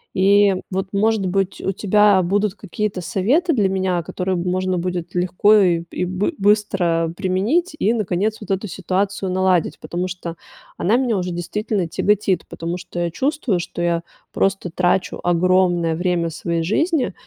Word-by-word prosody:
И 200 +1 +4 0.2
вот, 190 +1 -2
может 215 0 +1
быть, 195 +1 -1
у 195 - -1
тебя 205 0 +4
будут 200 +2 0
какие-то 205 -1 -3
советы 260 - +1
для 205 -6 +2
меня, 185 -2 0
которые, 185 +2 -2
м, - - -2
можно 185 0 0
будет 180 -1 -4
легко 180 +4 +3
и 175 -5 +3
и - - -2
бы 190 - -1
быстро 190 -5 +1
применить 210 - 0
и, 225 - +2
наконец, 210 0 -1
вот 210 - -10
эту 195 +2 -1
ситуацию 190 +1 -2
наладить, 185 -2 +1
потому 180 +2 -3
что 175 -2 -6 0.4
она 220 +7 +2
меня 245 -4 +1
уже 180 0 -2
действительно 175 +2 -2
тяготит, 195 0 0
потому 170 +2 -4
что 175 -1 -7
я 170 -1 -1
чувствую, 265 - 0
что 175 - -5
я 170 -1 +1 0.3
просто 195 -3 0
трачу 180 +1 0
огромное 175 -1 +2
время 175 -1 0
своей 165 +1 -2
жизни 290 - 0
185 Hz, 160 wpm, -20 LUFS, 175-205 Hz, 0.4 s, И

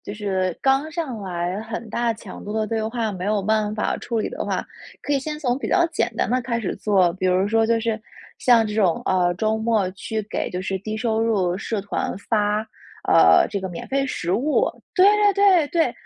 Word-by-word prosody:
就 205 - -6
是 190 -4 -1
刚 270 +3 +2
上 300 -8 -3
来 180 0 -3
很 225 0 -6
大 235 0 0
强 220 - -10
度 205 - -5
的 220 0 0
对 225 +1 -1
话， 225 -1 -2
没 185 -2 -5
有 210 -1 0
办 215 +1 0
法 210 - -1
处 230 -2 -2
理 - - -2
的 - - -5
话， - - -2 0.4
可 290 - -2
以 280 - +3
先 300 +3 -4
从 255 -4 0
比 - - -4
较 360 -2 +3
简 310 -7 -1
单 - - 0
的 255 +1 +2
开 235 -1 -2
始 195 - -3
做。 190 -5 +2
比 185 0 -2
如 185 +2 +2
说 225 0 +2
就 230 0 +2
是， 225 -1 -2 0.4
像 235 -3 +5
这 210 - -4
种， 190 -6 +2
呃， 180 -1 +2
周 220 +3 0
末 220 -4 +1
去 215 +3 -4
给 205 - -3
就 180 +1 -4
是 190 +1 -2
低 215 +3 -5
收 220 -1 0
入 195 -6 +1
社 215 +1 -3
团 200 -1 -3
发， 210 0 0 0.5
呃， 80 0 +6
这 200 - -2
个 190 - -4
免 175 - -7
费 275 0 0
食 175 -9 -3
物。 305 - +1 0.2
对 370 +1 +6 0.3
对 390 -5 +4
对， 330 +1 +1
220 Hz, 235 characters per minute, -22 LUFS, 195-240 Hz, 0.5 s, 呃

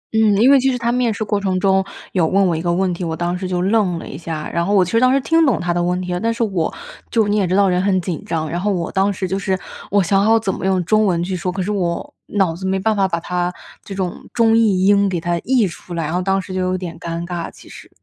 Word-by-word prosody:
嗯， 215 -2 +4
因 240 +6 +5
为 280 - +7
其 265 +1 +2
实 250 - -1
他 235 -1 0
面 245 -1 +1
试 215 +1 -3
过 205 -1 -1
程 190 -2 0
中 190 0 +3 0.3
有 175 -4 +2
问 195 +3 +3
我 175 -3 +1
一 160 - -3
个 175 0 0
问 180 +1 +1
题， 175 - -5
我 165 -1 -2
当 175 +1 -1
时 185 +1 -4
就 180 -1 -1
愣 195 -3 +1
了 - - -8
一 - - -8
下， 155 0 -5
然 170 - +1
后 200 +4 +1
我 190 -2 +5
其 180 - -6
实 230 - +3
当 255 +1 +4
时 275 - +3
听 325 +4 +3
懂 270 -8 +2
他 175 0 -1
的 175 - 0
问 180 +1 0
题 180 0 -3
了， 175 - -1
但 230 +4 0
是 230 +1 -1
我 190 -7 -1 0.4
就 225 -3 +2
你 205 - +1
也 195 -3 +1
知 180 - 0
道 200 0 +4
人 180 -1 +1
很 190 -1 +2
紧 175 -3 -4
张。 160 -1 -2
然 175 +3 -3
后 205 +2 +1
我 175 -4 -2
当 195 +1 +2
时 190 -1 -3
就 190 +1 -2
是 190 0 -1 0.3
我 200 -1 +3
想 195 +3 +2
好 225 +2 +4
怎 200 -4 -1
么 - - -5
用 190 -2 +1
中 215 +3 +3
文 170 -2 +1
去 185 +1 -3
说， 180 +1 -2
可 190 0 -3
是 205 - -2
我 175 -4 -2
脑 190 -5 0
子 190 +2 -5
没 190 0 +1
办 220 +3 +1
法 195 -1 +2
把 170 -3 -2
它 175 +1 -2 0.3
这 195 - -8
种 185 -2 -4
中 225 -1 +4
译 205 -5 +3
英 200 0 +4
给 180 -2 -1
它 170 +1 -1
译 250 +2 +2
出 175 0 -9
来， 165 - -2
然 155 - -3
后 180 - 0
当 195 +1 +1
时 190 0 -7
就 185 - -1
有 185 0 0
点 175 -2 -6
尴 170 0 -4
尬， 175 -1 -4
其 - - -17
实。 - - -12
190 Hz, 335 characters per minute, -19 LUFS, 175-205 Hz, 0.4 s, 为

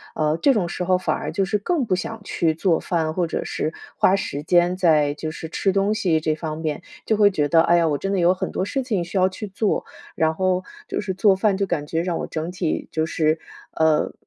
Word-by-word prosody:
呃， 155 +1 +1
这 275 +7 +4
种 185 -6 0
时 180 - -3
候 185 +1 +3
反 - - 0
而 - - -4
就 195 - 0
是， 210 +2 0
更 290 - 0
不 200 -6 +1
想 220 +4 -5
去 165 -5 0
做 165 0 +1
饭， 160 -3 -1
或 180 - +1
者 165 - -3
是 155 - -3 0.2
花 190 - +4
时 145 -7 -4
间 175 +2 +3
在， 155 -5 +3
就 155 +1 -4
是 160 0 -7
吃 195 - 0
东 200 +1 +2
西 175 -6 +1
这 155 -1 0
方 155 -1 -5
面 155 -2 -3 0.2
就 220 - +2
会 205 -1 +5
觉 145 -5 0
得， 165 -1 +5
哎 170 +1 +4
呀， 170 -1 +3
我 145 -2 +1
真 195 +5 -2
的 195 - +1
有 175 +1 +4
很 - - -3
多 - - -2
事 270 +7 -2
情 210 -8 -1
需 175 +3 -4
要 185 - +4
去 190 +3 -6
做， 200 +2 -1 0.3
然 160 0 +2
后， 185 0 +1 0.2
就 - - -2
是 200 -2 -3
做 195 0 +4
饭 195 0 +1
就 200 - +1
感 165 -6 -2
觉 165 +2 -1
让 175 -2 -1
我 - - -4
整 160 +2 -4
体 180 -3 -2
就 160 0 0
是， 155 -1 +1 0.3
呃， 160 -1 +2
175 Hz, 270 characters per minute, -22 LUFS, 160-195 Hz, 0.3 s, 会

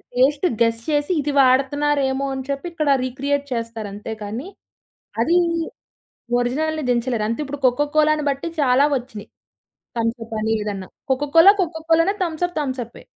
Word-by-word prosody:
Taste 280 +6 +3 0.2
guess 230 0 +2
చేసి 290 +2 +1
ఇది 290 +1 -2
వాడుతున్నారేమో 275 +1 +2
అని 265 -1 -4
చెప్పి 275 +4 -3
ఇక్కడ 310 -3 -1
రీక్రియేట్ 280 +3 -1
చేస్తారంతే 225 -3 -5
కానీ, 225 - -5 0.7
అది 335 +9 +3 1.0
ఒరిజినల్‌ని 310 +6 -1
దించలేరు. 240 -2 0
అంతే 230 +6 -2
ఇప్పుడు 285 +1 -6
కొక్క 250 +4 +1
కోలాని 305 -1 +3
బట్టి 280 +4 -2
చాలా 260 +1 +4
ఒచ్చినయి, 240 -4 -9 0.7
తంసప్ 230 0 -3
అని 220 +1 0
ఏదన్నా. 200 -3 -4 0.2
Coca Cola 310 +8 +6
కొక్కకోలానే, 330 +2 +1
Thums Up 350 +1 -2
థమ్సప్పే. 255 -4 -5
270 Hz, 130 wpm, -21 LUFS, 235-300 Hz, 1.0 s, Coca Cola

